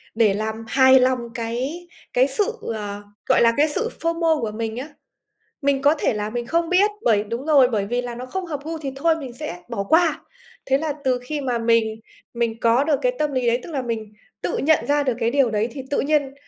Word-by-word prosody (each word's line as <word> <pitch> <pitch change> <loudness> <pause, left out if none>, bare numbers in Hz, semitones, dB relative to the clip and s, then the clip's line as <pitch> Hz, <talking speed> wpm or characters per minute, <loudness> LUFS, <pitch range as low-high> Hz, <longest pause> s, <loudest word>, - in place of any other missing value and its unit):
để 220 -3 +4
làm 220 +2 -2
hài 260 +1 +6
lòng 255 0 +2 0.2
cái 255 +9 -4 0.3
cái 255 +2 +4
sự, 410 - 0 0.2
ờ, 205 -1 -5 0.3
gọi - - +5
là, 230 0 +5
cái 300 +2 +4
sự 450 +10 -2
FOMO 330 -2 +1
của 220 -2 -2
mình 225 +1 -4
á, 270 +5 -5 0.7
mình 275 -1 +1
có 290 +2 +5
thể - - +1
là 210 0 -3
mình 240 +1 -4
không 335 +3 0
biết, 390 +3 +4
bởi 210 - +3
đúng 235 +6 -5
rồi, 280 -5 +6
bởi 205 -4 -1
vì 245 +3 -1
là 245 -1 -5
nó 250 +2 -7
không 375 +7 -4
hợp 295 -4 -4
gu 325 +1 -4
thì 280 -3 -5
thôi 320 +3 +2
mình 270 -6 -7
sẽ 245 - -7
bỏ 200 - -2
qua. 320 -1 +3 0.4
Thế 270 +1 +3
là 310 0 -2
từ 255 -1 +1
khi 295 +3 -3
mà 250 -4 -1
mình 230 -1 +1 0.3
mình 230 -1 -1
có 235 +4 +3
được 295 -2 +2
cái - - +2
tâm 300 -1 0
lý 255 -2 0
đấy, 235 +1 +2
tức - - -9
là 275 -3 -1
mình 225 -3 -4 0.3
tự - - -1
nhận 315 +2 +2
ra 290 0 +2
được 260 -4 0
cái 230 0 +2
điều 270 -2 +3
đấy 215 +1 0
thì 270 - -6
tự 285 - +1
nhiên 285 -2 0
260 Hz, 235 wpm, -22 LUFS, 230-300 Hz, 0.7 s, hài